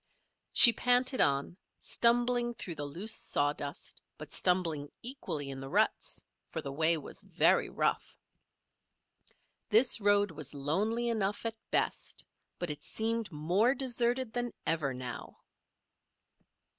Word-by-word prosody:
She 235 - +9
panted 250 +2 +3
on, 140 +5 +1 0.2
stumbling 240 0 +1
through 175 - -5
the 145 -2 -5
loose 185 +10 -1
sawdust, 145 -6 -2 0.2
but - - -10
stumbling 165 -6 0
equally 160 - -4
in 135 - -7
the 135 0 -8
ruts; - - 0 0.2
for - - -5
the 140 - -6
way 160 +3 +2
was 150 - -5
very - - +2
rough. - - -2 1.5
This 230 +1 +4
road 205 -1 +3
was 150 -2 -5
lonely 205 +12 -1
enough 210 -2 -1
at 225 - -1 0.2
best; - - -1 0.3
but 175 -3 -3
it 150 0 -8
seemed 225 -1 -2
more 180 - +1
deserted 245 -1 -1
than 245 -1 -3
ever 155 -4 0
now. 125 -1 -8
200 Hz, 125 wpm, -31 LUFS, 150-235 Hz, 1.5 s, She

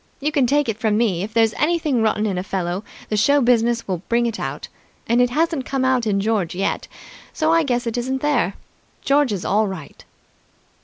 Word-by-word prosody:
You 300 +2 -1
can 280 -4 +2
take 290 +2 +2
it 225 -1 -3
from 215 -2 +1
me, 205 -7 +1
if 205 +3 -4
there's 225 -1 +3
anything 305 -6 +1
rotten 215 -1 +1
in 195 -4 -1
a - - -3
fellow, 185 0 -3 0.3
the 215 - 0
show 280 +8 +4
business 235 -2 +2
will 185 -4 -2
bring 235 +1 +2
it 230 -1 -3
out, - - -5 0.4
and 235 +2 +3
it 245 - +3
hasn't 310 0 0
come 270 -1 -1
out 255 -3 +1
in 200 -2 +1
George 200 -5 -1
yet, 195 +2 -2 0.5
so 315 +1 +1
I 330 - +4
guess 245 -5 -1
it 230 +1 -2
isn't 265 +2 -3
there. 250 -10 +1 0.5
George 280 -2 +3
is 195 -3 -3
all 210 +3 +2
right!" 185 -7 -8
235 Hz, 210 wpm, -21 LUFS, 210-265 Hz, 0.5 s, show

